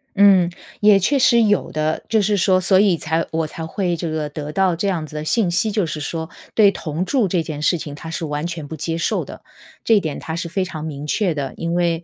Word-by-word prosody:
嗯， 195 Hz, -3 st, +6 dB, 0.3 s
也 210 Hz, -1 st, +6 dB
确 275 Hz, +9 st, +2 dB
实 235 Hz, -2 st, +5 dB
有 205 Hz, -2 st, +1 dB
的。 155 Hz, +1 st, -1 dB
就 220 Hz, -1 st, +3 dB
是 205 Hz, +1 st, +1 dB
说 185 Hz, -1 st, +3 dB
所 185 Hz, +1 st, +3 dB
以 195 Hz, -4 st, +4 dB
才 160 Hz, +1 st, -1 dB
我 160 Hz, -1 st, -1 dB
才 160 Hz, +1 st, -7 dB
会 175 Hz, +1 st, -1 dB
这 165 Hz, 0 st, -4 dB
个 155 Hz, -1 st, -2 dB
得 150 Hz, 0 st, -6 dB
到 185 Hz, +1 st, +2 dB
这 190 Hz, +5 st, -2 dB
样 170 Hz, -5 st, -1 dB
子 155 Hz, -, -12 dB
的 150 Hz, -, -3 dB
信 190 Hz, +3 st, +1 dB
息， 215 Hz, +5 st, +1 dB
就 205 Hz, -3 st, +1 dB
是 155 Hz, -1 st, -4 dB
说 160 Hz, +2 st, -4 dB, 0.3 s
对 205 Hz, -3 st, +6 dB
同 165 Hz, 0 st, -4 dB
住 255 Hz, -5 st, +1 dB
这 180 Hz, -1 st, 0 dB
件 150 Hz, -2 st, -6 dB
事 175 Hz, +3 st, +2 dB
情 150 Hz, -2 st, -7 dB
他 160 Hz, +2 st, -8 dB
是 165 Hz, 0 st, -3 dB
完 150 Hz, +1 st, -3 dB
全 165 Hz, -4 st, -6 dB
不 160 Hz, -, -6 dB
接 165 Hz, +2 st, -3 dB
受 165 Hz, -, 0 dB
的。 -, -, -11 dB, 0.4 s
这 220 Hz, -3 st, +4 dB
点 155 Hz, -5 st, -4 dB
他 160 Hz, -, -5 dB
是 170 Hz, 0 st, -4 dB
非 190 Hz, +2 st, -1 dB
常 155 Hz, -4 st, -7 dB
明 150 Hz, -2 st, -6 dB
确 185 Hz, +3 st, 0 dB
的， 140 Hz, -3 st, -4 dB
因 170 Hz, 0 st, -2 dB
为， 170 Hz, -1 st, 0 dB
170 Hz, 270 characters per minute, -20 LUFS, 155-195 Hz, 0.4 s, 嗯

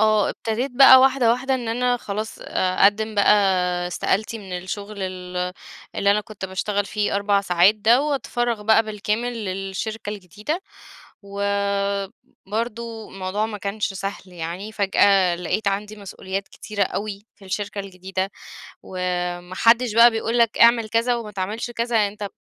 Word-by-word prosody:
آه. 215 Hz, -1 st, +3 dB
ابتديت 235 Hz, +4 st, -3 dB
بقى 260 Hz, 0 st, +9 dB
واحدة، 260 Hz, -3 st, +4 dB
واحدة 265 Hz, +2 st, -1 dB
إن 240 Hz, -3 st, -3 dB
أنا 245 Hz, +2 st, +1 dB
خلاص 215 Hz, -1 st, -5 dB
أقدِّم 205 Hz, +4 st, +1 dB
بقى 200 Hz, -, +5 dB, 0.6 s
استقالتي 215 Hz, +5 st, -1 dB
من 190 Hz, -3 st, -6 dB
الشغل 200 Hz, +2 st, -6 dB
ال 180 Hz, -1 st, -4 dB, 0.4 s
اللي 200 Hz, -, +3 dB
أنا 210 Hz, -, +1 dB
كنت 210 Hz, -2 st, -9 dB
باشتغل 200 Hz, +2 st, -1 dB
فيه 210 Hz, -1 st, -1 dB
4 200 Hz, 0 st, +2 dB
ساعات 180 Hz, +1 st, +4 dB
ده 230 Hz, +5 st, +3 dB
وأتفرّغ 240 Hz, -6 st, -1 dB
بقى 220 Hz, +1 st, +5 dB
بالكامل 215 Hz, +2 st, -3 dB
للشركة 195 Hz, +3 st, -4 dB
الجديدة. 210 Hz, -, -5 dB, 0.6 s
و 200 Hz, 0 st, -6 dB, 1.0 s
برضه 225 Hz, +1 st, -4 dB
الموضوع 195 Hz, +3 st, -2 dB
ما 215 Hz, -2 st, -6 dB
كانش 200 Hz, 0 st, -3 dB
سهل 195 Hz, +1 st, -5 dB
يعني، 175 Hz, +5 st, -6 dB
فجأة 195 Hz, -3 st, +3 dB
لقيت 200 Hz, +4 st, -1 dB
عندي 210 Hz, +2 st, -3 dB
مسؤوليات 195 Hz, -1 st, -6 dB
كتيرة 210 Hz, -2 st, -4 dB
أوي 205 Hz, +1 st, -5 dB
في 200 Hz, -, -18 dB
الشركة 205 Hz, +2 st, -4 dB
الجديدة، 190 Hz, 0 st, -4 dB, 0.5 s
وما 180 Hz, -1 st, -3 dB
حدّش 230 Hz, -1 st, +4 dB
بقى 235 Hz, +1 st, +8 dB
بيقول 225 Hz, +1 st, -1 dB
لك 230 Hz, -1 st, +2 dB
اعمل 235 Hz, -1 st, +5 dB
كذا 230 Hz, +2 st, +1 dB
وما 220 Hz, -3 st, -6 dB
تعملش 205 Hz, +5 st, -4 dB
كذا، 235 Hz, 0 st, -1 dB
يعني 210 Hz, -2 st, +3 dB
أنت 210 Hz, -, -12 dB
ب -, -, -3 dB
210 Hz, 150 wpm, -22 LUFS, 195-225 Hz, 1.0 s, بقى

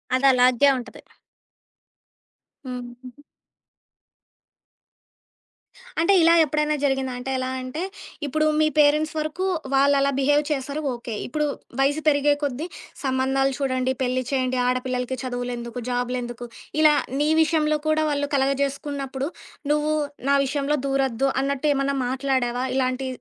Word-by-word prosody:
అదలాగే 255 Hz, 0 st, +5 dB
ఉంటది. 245 Hz, -, -9 dB, 1.6 s
హ్మ్. 250 Hz, -1 st, -5 dB, 0.2 s
హుహు. 255 Hz, +3 st, -12 dB, 2.8 s
అంటే 335 Hz, +4 st, +4 dB
ఇలా 335 Hz, -, +6 dB
ఎప్పుడైనా 300 Hz, +1 st, 0 dB
జరిగిందా? 270 Hz, -2 st, 0 dB
అంటే 255 Hz, +2 st, -4 dB
ఎలా 255 Hz, 0 st, -2 dB
అంటే 255 Hz, +7 st, -5 dB, 0.4 s
ఇప్పుడు 310 Hz, +2 st, +1 dB
మీ 310 Hz, -, +4 dB
పేరెంట్స్ 300 Hz, +1 st, +4 dB
వరకు 310 Hz, +5 st, -2 dB, 0.3 s
వాళ్ళలా 280 Hz, 0 st, +4 dB
బిహేవ్ 290 Hz, +2 st, +3 dB
చేశారు. 280 Hz, +1 st, -2 dB
ఓకే. 235 Hz, -1 st, -7 dB
ఇప్పుడు 300 Hz, +4 st, -1 dB, 0.3 s
వయసు 285 Hz, +3 st, +2 dB
పెరిగే 290 Hz, -1 st, +4 dB
కొద్దీ 285 Hz, +3 st, -2 dB, 0.4 s
సంబంధాలు 265 Hz, 0 st, +1 dB
చూడండి, 255 Hz, -1 st, 0 dB
పెళ్లి 255 Hz, 0 st, 0 dB
చేయండి, 255 Hz, -2 st, 0 dB
ఆడపిల్లలకి 255 Hz, 0 st, -1 dB
చదువులెందుకు? 245 Hz, -1 st, -4 dB
జాబులెందుకు? 245 Hz, -1 st, -3 dB, 0.3 s
ఇలా 305 Hz, -1 st, +7 dB, 0.3 s
నీ 300 Hz, -, +2 dB
విషయంలో 305 Hz, -1 st, +1 dB
కూడా 310 Hz, 0 st, +2 dB
వాళ్ళు 285 Hz, 0 st, -1 dB
కలగ 270 Hz, 0 st, +2 dB
చేేసుకున్నప్పుడు 275 Hz, -1 st, -3 dB, 0.4 s
నువ్వు 300 Hz, +1 st, +1 dB, 0.4 s
నా 280 Hz, -, +5 dB
విషయంలో 285 Hz, +2 st, 0 dB
దూరొద్దు 270 Hz, -1 st, +1 dB
అన్నట్టేమన్నా 275 Hz, 0 st, 0 dB
మాట్లాడావా? 255 Hz, -2 st, 0 dB
ఇలాంటి 260 Hz, 0 st, 0 dB
270 Hz, 115 wpm, -23 LUFS, 255-290 Hz, 2.8 s, ఇలా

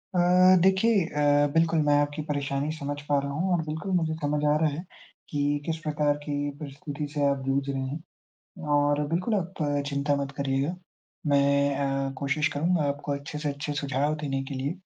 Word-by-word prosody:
अ, -, -, +3 dB, 0.4 s
देखिए, 190 Hz, +1 st, +4 dB
अ, 145 Hz, -2 st, +3 dB
बिल्कुल 165 Hz, 0 st, +3 dB
मैं 145 Hz, -1 st, +3 dB
आपकी 145 Hz, +1 st, -2 dB
परेशानी 140 Hz, +1 st, -1 dB
समझ 145 Hz, -1 st, -3 dB
पा 145 Hz, -, +4 dB
रहा 140 Hz, -, -3 dB
हूँ 180 Hz, +6 st, -1 dB
और 170 Hz, -, +2 dB
बिल्कुल 155 Hz, +5 st, -4 dB
मुझे 160 Hz, -2 st, +1 dB
समझ 145 Hz, 0 st, 0 dB
आ 150 Hz, -, +4 dB
रहा 160 Hz, -, +4 dB
है 150 Hz, +4 st, -5 dB, 0.5 s
कि 145 Hz, 0 st, 0 dB
किस 165 Hz, -1 st, -1 dB
प्रकार 150 Hz, -1 st, +1 dB
की 145 Hz, -1 st, -2 dB
परिस्थिति 145 Hz, 0 st, -6 dB
से 145 Hz, -1 st, +1 dB
आप 140 Hz, -1 st, +1 dB
जूझ 135 Hz, +1 st, 0 dB
रहे 135 Hz, -1 st, -2 dB
हैं 145 Hz, +5 st, -8 dB, 0.5 s
और 145 Hz, 0 st, +3 dB
बिल्कुल 180 Hz, +8 st, 0 dB
आप 185 Hz, -3 st, -2 dB, 0.2 s
चिंता 145 Hz, 0 st, 0 dB
मत 140 Hz, 0 st, -3 dB
करिएगा 140 Hz, +4 st, 0 dB, 0.5 s
मैं 140 Hz, 0 st, +3 dB
अ, 135 Hz, -1 st, -1 dB
कोशिश 145 Hz, +3 st, +1 dB
करूँगा 165 Hz, +2 st, +1 dB
आपको 145 Hz, 0 st, -3 dB
अच्छे 140 Hz, +1 st, -5 dB
से 150 Hz, -1 st, -2 dB
अच्छे 145 Hz, +1 st, -3 dB
सुझाव 145 Hz, +1 st, 0 dB
देने 135 Hz, -2 st, -1 dB
के 140 Hz, -, -5 dB
लिए। 135 Hz, +2 st, -2 dB
145 Hz, 185 wpm, -27 LUFS, 140-155 Hz, 0.5 s, देखिए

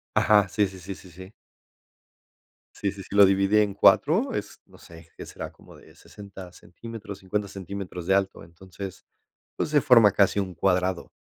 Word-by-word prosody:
Ajá, 105 Hz, -2 st, +4 dB
sí 105 Hz, +1 st, 0 dB
sí 95 Hz, 0 st, -12 dB
sí 95 Hz, +2 st, -8 dB
sí 90 Hz, -, -15 dB
sí. 95 Hz, +4 st, -12 dB, 1.4 s
Sí 100 Hz, -, -2 dB
sí 100 Hz, -, -10 dB
sí, 100 Hz, -, -9 dB
lo 100 Hz, 0 st, +8 dB
dividí 95 Hz, +2 st, +2 dB
en 105 Hz, -1 st, +1 dB
4, 155 Hz, -, +3 dB
es, -, -, -6 dB
no -, -, -19 dB
sé, 80 Hz, -1 st, -15 dB
que -, -, -8 dB
será -, -, -8 dB
como -, -, -18 dB
de -, -, -18 dB
60 95 Hz, -3 st, -12 dB
centímetros, 105 Hz, +3 st, -10 dB
50 100 Hz, +2 st, -3 dB
centímetros 95 Hz, -2 st, -7 dB
de 95 Hz, -, +2 dB
alto. 95 Hz, -3 st, -1 dB
Entonces, 95 Hz, +3 st, -11 dB, 0.5 s
pues -, -, -2 dB
se 150 Hz, -1 st, +3 dB
forma 115 Hz, -6 st, +6 dB
casi 100 Hz, 0 st, +2 dB
un 95 Hz, -2 st, -3 dB
cuadrado, 90 Hz, -1 st, -1 dB
95 Hz, 175 wpm, -25 LUFS, 95-105 Hz, 1.4 s, lo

